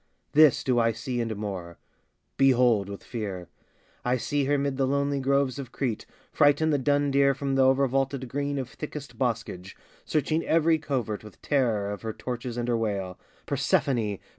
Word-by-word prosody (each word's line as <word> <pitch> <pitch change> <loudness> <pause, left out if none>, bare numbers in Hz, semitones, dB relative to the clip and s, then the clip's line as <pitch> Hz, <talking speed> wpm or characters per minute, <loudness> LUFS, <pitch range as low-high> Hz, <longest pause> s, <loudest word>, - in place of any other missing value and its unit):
This 155 -2 +5
do 125 -2 +2
I 115 0 +2
see, 120 +2 -3
and 115 -1 -2
more: 95 -5 -6 0.6
Behold, 125 -7 +3
with 100 - -8
fear! 100 -7 -5 0.5
I 125 +1 +1
see 140 +4 -1
her 145 +1 +2
'mid 140 -1 -1
the 135 -1 +1
lonely 140 +1 0
groves 140 0 +1
of 130 -3 -7
Crete, 120 -6 -3 0.2
Frighten 150 +1 +3
the 145 - +2
dun 145 +1 +1
deer 140 0 +4
from 135 0 -2
th' - - +1
o'ervaulted 135 0 +2
green 140 +3 -2
Of 130 -2 -3
thickest 150 0 -8
boscage, 115 -7 -3 0.3
searching 155 +2 0
every 165 0 +3
covert 125 -9 -3
With 105 -2 -13
terror 115 -8 +1
of 105 - -6
her 110 -1 -4
torches 120 0 -5
and 120 0 -2
her 120 - +2
wail, 100 -5 -2 0.3
"Persephone! 110 -7 +1
130 Hz, 170 wpm, -27 LUFS, 115-140 Hz, 0.6 s, This